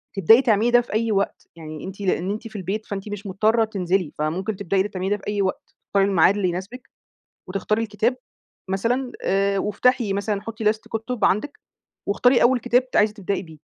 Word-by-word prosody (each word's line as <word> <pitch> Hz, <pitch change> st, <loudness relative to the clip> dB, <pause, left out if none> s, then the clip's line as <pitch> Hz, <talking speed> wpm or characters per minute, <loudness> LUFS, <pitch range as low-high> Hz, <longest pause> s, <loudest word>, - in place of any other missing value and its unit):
تبدئي 205 Hz, +6 st, +6 dB
تعملي 230 Hz, -2 st, +2 dB
ده 245 Hz, 0 st, +6 dB
في 235 Hz, -, -10 dB
أي 225 Hz, +1 st, +1 dB
وقت، 200 Hz, -1 st, -1 dB
يعني 155 Hz, -2 st, -9 dB
أنتِ 195 Hz, +2 st, -8 dB
لإن 185 Hz, 0 st, 0 dB
أنتِ 220 Hz, +2 st, -5 dB
في 220 Hz, -, -15 dB
البيت 200 Hz, +3 st, -3 dB
فأنتِ 200 Hz, +1 st, -6 dB
مش 205 Hz, 0 st, -6 dB
مضطرة 220 Hz, +4 st, +2 dB
تنزلي، 185 Hz, -5 st, -1 dB
فممكن 180 Hz, +7 st, -2 dB
تبدئي 195 Hz, 0 st, -1 dB
اللي 195 Hz, +2 st, +1 dB
بتعمليه 185 Hz, 0 st, -3 dB
ده 205 Hz, -, +1 dB
في 195 Hz, -, -14 dB
أي 205 Hz, -1 st, 0 dB
وقت، 190 Hz, -1 st, -3 dB
تختاري 195 Hz, -1 st, +2 dB
الميعاد 190 Hz, 0 st, +4 dB
اللي 195 Hz, -3 st, 0 dB
يناسبِك، 195 Hz, +9 st, -7 dB, 0.6 s
وتختاري 210 Hz, +4 st, -1 dB
الكتاب 225 Hz, +3 st, 0 dB, 0.5 s
مثلًا، 245 Hz, +6 st, -1 dB
آآ 195 Hz, +1 st, +1 dB
وافتحي 210 Hz, +2 st, +1 dB
مثلًا 200 Hz, 0 st, -2 dB
حطّي 225 Hz, +1 st, -6 dB
list 220 Hz, -, -13 dB
كُتب 225 Hz, 0 st, -2 dB
عندِك، 275 Hz, +9 st, +1 dB, 0.5 s
واختاري 245 Hz, +5 st, +4 dB
أول 250 Hz, +1 st, +4 dB
كتاب 245 Hz, +2 st, +1 dB
ت -, -, -3 dB
عايزة 210 Hz, 0 st, +3 dB
تبدئي 200 Hz, -2 st, -3 dB
بيه. 160 Hz, -4 st, -13 dB
205 Hz, 195 wpm, -23 LUFS, 190-225 Hz, 0.6 s, تبدئي